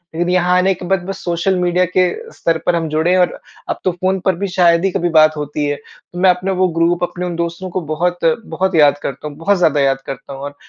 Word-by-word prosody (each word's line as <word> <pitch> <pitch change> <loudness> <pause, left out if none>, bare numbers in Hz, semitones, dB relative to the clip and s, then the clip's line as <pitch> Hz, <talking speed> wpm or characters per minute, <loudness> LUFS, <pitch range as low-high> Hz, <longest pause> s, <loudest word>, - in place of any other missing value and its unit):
लेकिन 175 +2 -1
यहाँ 180 0 +2
आने 190 +1 +3
के 180 - -9
बाद 185 0 0
बस 195 +1 -6
सोशल 175 +2 0
मीडिया 180 0 +2
के 185 0 +5 0.3
स्तर 165 -1 0
पर 175 - +2
हम 165 -1 -1
जुड़े 160 +3 +1
हैं 185 - +4
और 180 - +1 0.3
अब - - -2
तो 185 - +1
फ़ोन 185 +2 -1
पर 190 - +2
भी 200 +3 -3
शायद 170 0 +4
ही 195 - +1
कभी 175 0 -1
बात 155 0 +5
होती 150 0 -3
है। 145 0 -1
तो 175 - -14
मैं 185 +1 +5
अपना 180 +2 +1
वो 185 - +4
ग्रुप 170 +1 +2
अपने 180 0 -3
उन 175 -1 -4
दोस्तों 170 +2 -4
को 185 +1 -3
बहुत, 175 +3 -2 0.3
बहुत 190 -1 -1
याद 145 -2 +5
करता 140 +2 -5
हूँ, 145 - -9
बहुत 200 +5 +1
ज़्यादा 155 -5 +2
याद 135 -1 +1
करता 135 +1 -7
हूँ। 135 - -9
और 145 0 -6
175 Hz, 260 wpm, -17 LUFS, 155-185 Hz, 0.3 s, के